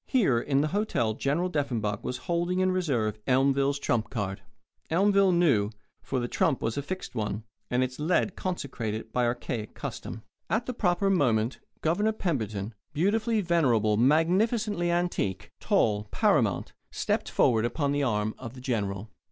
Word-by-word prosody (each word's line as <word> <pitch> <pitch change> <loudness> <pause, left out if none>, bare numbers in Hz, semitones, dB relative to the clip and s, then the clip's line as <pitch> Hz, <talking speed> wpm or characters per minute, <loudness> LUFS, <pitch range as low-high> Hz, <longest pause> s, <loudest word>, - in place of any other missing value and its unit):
Here, 190 - +3
in 140 +2 +1
the 155 - 0
hotel 190 - 0
General 145 +10 0
Deffenbaugh 120 - -1
was 125 - -3
holding 175 +1 0
in 185 0 +3
reserve 120 - 0
Elmville's 135 +2 +3
trump 115 -5 0
card. 100 -4 -3 0.5
Elmville 195 +2 +4
knew; 145 - +3 0.3
for 130 - -2
the 120 - -2
trump 140 +2 +1
was 115 0 -2
a 140 - -1
fixed 185 +6 -6
one, 105 -2 -3 0.3
and 125 +1 +2
its 130 +1 -4
lead 180 +5 +1
consecrated 115 - -4
by 125 -1 +2
archaic 120 -2 -3
custom. 110 - -6 0.3
At 225 +2 0
the 250 - -3
proper 195 -2 +1
moment 120 - +2 0.2
Governor 205 +7 +1
Pemberton, 110 - -2 0.2
beautifully 215 +7 +1
venerable, 125 - +2
magnificently 175 - +2
antique, 170 - -1
tall, 105 -1 +1
paramount, - - +1 0.2
stepped - - -1
forward 110 -2 +3
upon 140 +4 0
the 145 0 0
arm 110 -5 0
of 120 -1 -8
the - - -9
General. 105 -5 -2
140 Hz, 150 wpm, -28 LUFS, 110-180 Hz, 0.5 s, Elmville